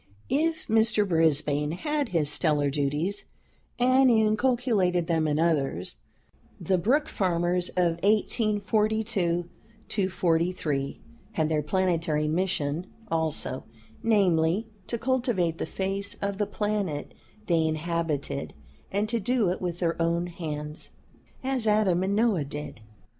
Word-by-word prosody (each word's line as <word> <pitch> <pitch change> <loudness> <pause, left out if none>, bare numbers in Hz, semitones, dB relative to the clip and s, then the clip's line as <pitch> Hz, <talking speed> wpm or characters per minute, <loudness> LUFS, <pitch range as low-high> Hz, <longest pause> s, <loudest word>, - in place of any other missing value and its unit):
If 320 +4 0
Mr. 220 -1 +3
Brisbane 150 -3 +2
had 295 - -1
his 165 -5 +2
"stellar 150 -2 +2
duties" 150 +7 -1 0.5
and 255 +1 +5
inculcated 220 -5 +2
them 160 -2 +1
in 150 0 +1
others, 150 - 0 0.6
the 190 -2 +1
Brook 275 - +2
Farmers 175 -1 0
of 170 -2 +2
1842 210 -3 0
43 165 -6 0 0.3
had 155 -1 +1
their 155 -1 +1
planetary 165 -2 0
mission 170 -1 -1 0.2
also; 160 -5 -1 0.4
namely, 190 -3 +2 0.2
to 235 - -2
cultivate 230 -9 0
the - - -2
face 195 +3 -3
of 200 0 -3
the 210 - +1
planet 205 -8 -2 0.3
they 165 -4 +2
inhabited, 155 - -2 0.4
and 205 +2 0
to 230 +1 -1
do 225 -1 +1
it 185 - -4
with 175 -2 -2
their 170 -1 -1
own 170 +1 +1
hands, 150 -3 -6 0.5
as 260 -4 0
Adam 210 -4 +3
and 195 +2 0
Noah 210 -9 +2
did. 145 -4 -7
180 Hz, 120 wpm, -27 LUFS, 160-215 Hz, 0.6 s, and